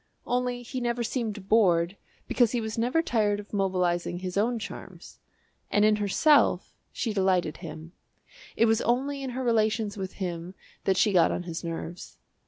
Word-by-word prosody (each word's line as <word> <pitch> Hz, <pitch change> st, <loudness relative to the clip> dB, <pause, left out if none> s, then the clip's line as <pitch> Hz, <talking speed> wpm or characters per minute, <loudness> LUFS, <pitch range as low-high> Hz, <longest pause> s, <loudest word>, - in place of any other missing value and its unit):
Only 245 Hz, 0 st, -1 dB
he 255 Hz, +1 st, -5 dB
never 240 Hz, 0 st, -1 dB
seemed 220 Hz, -4 st, -3 dB
bored 180 Hz, -5 st, +3 dB, 0.3 s
because 240 Hz, -2 st, +2 dB
he 245 Hz, -, +1 dB
was 220 Hz, -1 st, -4 dB
never 250 Hz, +8 st, +1 dB
tired 210 Hz, -7 st, +1 dB
of 205 Hz, +1 st, -11 dB
mobilising 180 Hz, -3 st, 0 dB
his 180 Hz, 0 st, -5 dB
own 230 Hz, +4 st, +1 dB
charms. 215 Hz, -, -9 dB, 0.5 s
And 205 Hz, 0 st, +3 dB
in 215 Hz, 0 st, +4 dB
herself, 245 Hz, +9 st, +3 dB, 0.2 s
she 225 Hz, -, -2 dB
delighted 190 Hz, -5 st, +1 dB
him 160 Hz, -1 st, -9 dB, 0.6 s
it 230 Hz, -, +4 dB
was 225 Hz, 0 st, +3 dB
only 275 Hz, +4 st, 0 dB
in 265 Hz, -, -4 dB
her 255 Hz, +1 st, -4 dB
relations 220 Hz, -3 st, +1 dB
with 190 Hz, -1 st, -5 dB
him 175 Hz, -1 st, -5 dB, 0.3 s
that 190 Hz, -1 st, +2 dB
she 205 Hz, +1 st, +3 dB
got 180 Hz, -, +5 dB
on -, -, -2 dB
his 170 Hz, -1 st, -6 dB
nerves. 170 Hz, +1 st, -6 dB
210 Hz, 170 wpm, -27 LUFS, 185-235 Hz, 0.6 s, got